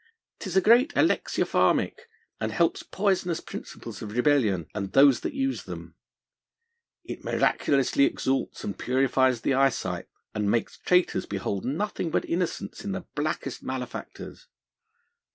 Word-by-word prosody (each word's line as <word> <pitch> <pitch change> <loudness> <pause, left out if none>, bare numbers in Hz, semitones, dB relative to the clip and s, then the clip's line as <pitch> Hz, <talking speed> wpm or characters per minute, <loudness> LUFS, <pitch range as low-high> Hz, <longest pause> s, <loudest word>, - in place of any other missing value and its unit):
'Tis - - -2
a - - +6
great 240 - +5
alexiopharmick, 470 0 +1 0.3
and - - -2
helps - - +1
poisonous 190 -4 0
principles - - -8
of 105 -1 -6
rebellion, 120 - +2
and 100 -2 -4
those 135 -2 +6
that - - -4
use 270 0 -1
them. - - -8 1.1
It - - -8
miraculously 140 0 +2
exalts 135 0 -1
and 100 - -3
purifies 130 -1 +2
the 140 - +1
eyesight, 125 -10 +1 0.3
and 105 -1 0
makes 115 +2 -1
traitors 180 0 +2
behold 100 -1 -3
nothing 170 +5 -2
but 160 - 0
innocence 175 0 -3
in 200 -1 -3
the 190 -2 -5
blackest 145 -3 -3
malefactors. 130 -1 -7
135 Hz, 130 wpm, -27 LUFS, 120-180 Hz, 1.1 s, a